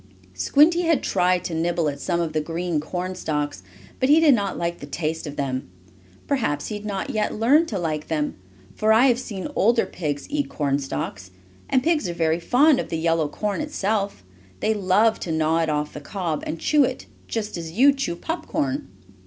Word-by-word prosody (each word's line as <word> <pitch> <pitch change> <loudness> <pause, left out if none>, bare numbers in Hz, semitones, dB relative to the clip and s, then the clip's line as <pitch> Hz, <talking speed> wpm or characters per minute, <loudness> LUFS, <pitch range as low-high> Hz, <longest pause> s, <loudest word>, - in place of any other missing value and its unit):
Squinty 300 - +4
had 330 -5 +2
tried 180 -1 +2
to 170 - -4
nibble 165 0 0
at 140 -1 -3
some 170 +3 -1
of 165 -2 -2
the 155 - +1
green 165 +1 -2
corn 180 +4 -4
stalks, 150 - -3 0.4
but 260 - +2
he 305 +2 +7
did 315 -3 +6
not 200 -5 -1
like 170 0 -2
the 145 - -8
taste 155 +2 -3
of 145 - -6
them. 130 -6 -3 0.6
Perhaps 225 - -1
he 215 - -3
had 205 0 -7
not 195 -2 -3
yet 215 -1 -1
learned 285 +9 +4
to 210 - -3
like 155 -4 -2
them, 150 -2 -1 0.4
for 215 0 +2
I 230 +4 +6
have 245 -2 +3
seen 200 -7 -5
older 230 +4 +3
pigs 145 -5 -4
eat 290 -1 -2
corn 140 -2 0
stalks. 95 -8 -5 0.4
And 260 -1 +2
pigs 310 - +1
are - - -3
very 165 0 +1
fond 260 - +4
of - - -4
the 165 - -2
yellow 165 -1 +1
corn 210 - -2
itself. 205 - -2 0.4
They 220 - +1
love 210 +2 +2
to 170 - -4
gnaw 160 +1 +2
it 165 -1 +1
off 150 0 -1
the 150 - -7
cob, 170 -1 -3
and 165 - -3
chew 300 - +4
it, 255 0 -2 0.2
just 215 -2 -3
as 165 -2 -6
you 270 +8 +6
chew 270 -11 -2
popcorn. 245 - -3
180 Hz, 200 wpm, -23 LUFS, 155-230 Hz, 0.6 s, he